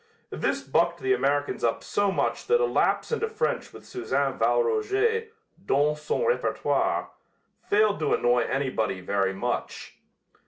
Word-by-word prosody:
This - - -1
bucked - - +1
the 390 0 +2
Americans 145 - 0
up 115 -1 0
so 205 -1 0
much - - -1
that 475 +2 +4
a 485 - +3
lapse - - +1
into 455 -1 -1
French 445 - -2
with - - -13
Suzanne 370 - -2
Valroger 450 -1 +1 0.4
"dans 150 -2 +1
son 155 - -1
repertoire" 480 +1 0 0.6
failed 210 0 +3
to 150 -2 +2
annoy 120 0 +2
anybody 125 -6 -1
very 95 +1 -1
much. - - -4
200 Hz, 140 wpm, -26 LUFS, -, 0.6 s, that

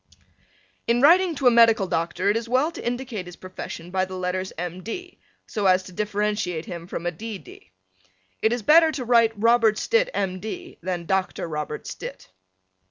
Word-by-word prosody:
In 235 +1 +3
writing 340 +5 +5
to 275 - -4
a 245 - +8
medical 230 -3 +5
doctor 170 +3 0
it - - -1
is 230 0 -3
well 260 +6 +2
to - - -9
indicate 240 -6 -4
his 180 - -9
profession 180 -2 -8
by 185 0 +1
the 185 0 -5
letters 185 +1 -2
M. 175 +1 -5
D. 360 - -7 0.3
so 210 -4 -1
as 185 0 +4
to 185 - -11
differentiate 205 -3 -2
him 170 -2 -7
from 170 - -5
a 175 - 0
D. 215 +5 -6
D. - - -15 0.7
It 220 - +3
is 240 -2 -2
better 320 +5 +6
to 255 -4 -4
write 230 -2 +4
Robert 230 -1 +4
Stitt, 475 - +2
M. 185 -1 -1
D., 355 - -7
than 175 -1 -3
Dr. 190 -1 -1
Robert 150 -1 -5
Stitt. 95 - -8
210 Hz, 185 wpm, -24 LUFS, 180-240 Hz, 0.7 s, a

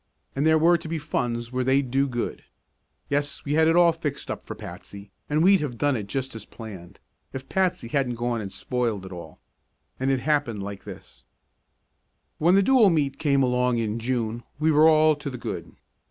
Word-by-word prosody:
And 140 +3 +1
there 160 0 +5
were 170 +2 +4
to - - -8
be 165 +1 -2
funds 120 -5 -3
where 130 0 -1
they'd 130 0 +1
do 135 +2 +2
good. 120 -3 -4 0.6
Yes, 145 0 -2
we 145 - -1
had 160 +1 +4
it 165 - +3
all 175 -1 +6
fixed 155 -4 -5
up - - -7
for - - -6
Patsy 100 0 -10 0.2
and 150 +2 +2
we'd 195 +1 +6
have 135 -6 -4
done 145 +1 +1
it 105 -4 -4
just 135 +4 -3
as 115 -2 -7
planned 100 -7 -11 0.3
if 130 0 -7
Patsy 185 -10 0
hadn't 125 -1 -1
gone 120 -1 -2
and 100 -2 -6
spoiled 115 -6 -2
it 95 - -9
all. 85 -2 -9 0.6
And 130 +1 0
it 135 -1 +1
happened 140 -8 0
like 100 0 -7
this: - - -11 1.2
When 175 +4 +4
the 195 - +5
Dual 240 -2 +5
Meet 145 -5 0
came 140 -3 +2
along 125 -1 +1
in 110 0 -2
June 115 -1 -2 0.2
we 155 +2 +2
were 155 +1 +6
all 155 0 +5
to 150 -1 -5
the 130 - -6
good. - - -6
135 Hz, 200 wpm, -25 LUFS, 115-155 Hz, 1.2 s, all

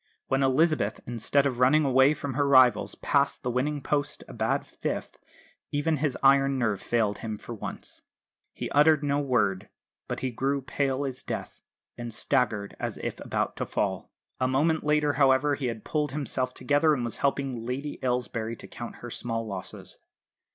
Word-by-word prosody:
When 135 +1 +2
Elizabeth, 135 -4 +2
instead 120 +4 +1
of 130 -3 -1
running 145 +4 +5
away 135 +2 +5
from 145 -2 -4
her 140 +3 +1
rivals, 130 -3 +5
passed - - +1
the 125 - -1
winning 140 +3 -1
post 145 -1 -1
a - - -10
bad - - 0
fifth, - - -5 0.5
even 150 +2 +1
his 145 -2 -1
iron 135 0 +5
nerve 110 -6 0
failed 110 -4 0
him 110 -2 -4
for 120 - -8
once. 110 - -7 0.5
He - - -6
uttered 150 +1 +5
no 145 0 +1
word; 105 -8 0 0.4
but - - -4
he 130 - -1
grew 135 +3 -1
pale 135 0 -1
as 130 -2 -5
death, - - -6 0.4
and 120 -1 -5
staggered 110 -3 0
as - - -3
if - - -5
about - - -2
to - - -2
fall. - - -2 0.3
A 130 - +2
moment 155 +5 +2
later, 150 -1 +2
however, 135 +1 +4
he 140 -2 -2
had 115 -3 -5
pulled 150 -3 -1
himself 130 -3 -2
together 150 +2 +3
and 125 -3 -2
was 115 - -3
helping 135 -4 -1
Lady 135 +5 -4
Aylesbury 125 -2 -1
to - - -11
count 120 - -8
her 120 - -7
small 115 -1 -3
losses. 95 -3 -6
130 Hz, 175 wpm, -27 LUFS, 120-145 Hz, 0.5 s, running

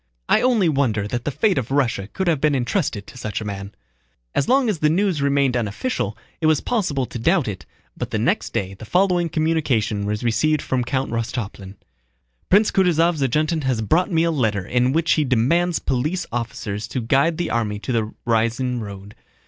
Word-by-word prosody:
"I - - +4
only 240 -7 +3
wonder 125 -9 +1
that 120 +2 -4
the - - +1
fate 190 - +1
of 125 - -5
Russia 125 -8 0
could 190 - -2
have 160 -6 +1
been 150 -2 +3
entrusted 125 - -1
to 125 - -12
such 110 -3 -3
a 110 - -6
man." 100 0 -6 0.6
As 135 - 0
long 265 -1 +4
as 205 -7 0
this 150 - +3
news 180 -2 +1
remained 140 -2 +2
unofficial 110 - -2 0.2
it 160 - +1
was 155 -2 +4
possible 170 - -1
to 120 - -7
doubt 165 +3 +2
it, 90 -8 -6 0.3
but - - -4
the - - -1
next - - 0
day 95 -1 -2
the 95 - -12
following 180 - +2
communication 130 -11 0
was 105 +2 -2
received 120 +7 +1
from 130 -1 0
Count 130 +1 -2
Rostopchín: 110 -4 -4 0.7
Prince 210 +3 +4
Kutúzov's 170 -4 +2
adjutant 155 +4 +1
has 125 -4 0
brought 175 - +2
me 165 -1 +3
a 170 - +2
letter 110 - 0
in 125 +4 +1
which 165 +3 +1
he 155 - +3
demands 150 +8 +2
police 150 +8 -1
officers 110 -3 -4
to 130 - -3
guide 140 +8 +2
the 175 - -2
army 110 -3 -1
to 115 - -5
the 110 -2 0
Ryazán 120 +2 0
road. 100 -1 -8
130 Hz, 195 wpm, -22 LUFS, 110-165 Hz, 0.7 s, I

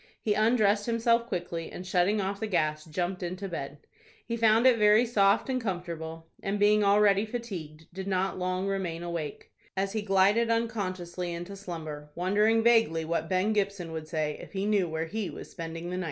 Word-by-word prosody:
He 210 - +1
undressed 215 -1 +3
himself 235 0 +2
quickly, 175 -4 -4
and, 180 - -7
shutting 185 +3 +2
off 195 0 -2
the 220 - -2
gas, 155 -5 0
jumped 175 +3 -3
into 185 +2 -4
bed. 145 -4 -6 0.4
He 230 - -2
found 225 +1 +4
it 250 -3 +6
very 210 +3 +6
soft 205 -3 +3
and 255 -1 -1
comfortable, 170 -5 -5 0.2
and, 195 +1 -1
being 210 +1 +4
already 200 0 +4
fatigued, 185 -10 -6
did 190 +1 -6
not 190 0 0
long 185 +1 -1
remain 180 -4 -2
awake, 170 -4 -5 0.3
as 195 +1 -1
he 220 - -1
glided 205 +3 +3
unconsciously 185 -6 -2
into 175 +3 -6
slumber, 155 -6 -7
wondering 210 +5 +2
vaguely 225 -9 +3
what 165 0 -2
Ben 185 +4 +2
Gibson 200 -5 -1
would 160 -1 -5
say 155 -2 -2
if - - -12
he 195 0 -1
knew 205 -4 +2
where 160 +1 -2
he 210 +3 -3
was - - -9
spending 165 0 -6
the 180 - -3
night. - - -2
190 Hz, 185 wpm, -28 LUFS, 170-210 Hz, 0.4 s, it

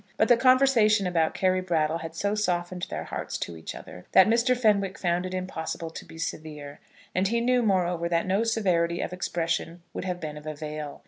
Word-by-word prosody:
But - - +3
the 240 - +8
conversation 240 -5 +4
about 165 -3 +1
Carry 185 0 +2
Brattle 165 -3 0
had 165 0 -7
so 200 +4 0
softened 180 -3 -1
their - - -4
hearts - - -5
to 85 - -5
each 80 - -7
other, 90 - -11
that 190 - +8
Mr. 235 +3 +3
Fenwick 200 -5 +2
found 180 0 0
it 185 - -7
impossible 165 -3 -4
to - - -9
be 160 - -13
severe. 150 -3 -6 0.3
And 185 +2 +2
he 235 +3 +1
knew, 250 +1 +2
moreover, 180 -5 +1
that 170 -1 +1
no 195 +4 +1
severity 175 -7 +1
of - - -4
expression 170 -1 -2
would - - -5
have 180 -1 -3
been 150 -2 -6
of 150 +1 -10
avail. 150 -1 -6
180 Hz, 200 wpm, -27 LUFS, 165-205 Hz, 0.3 s, the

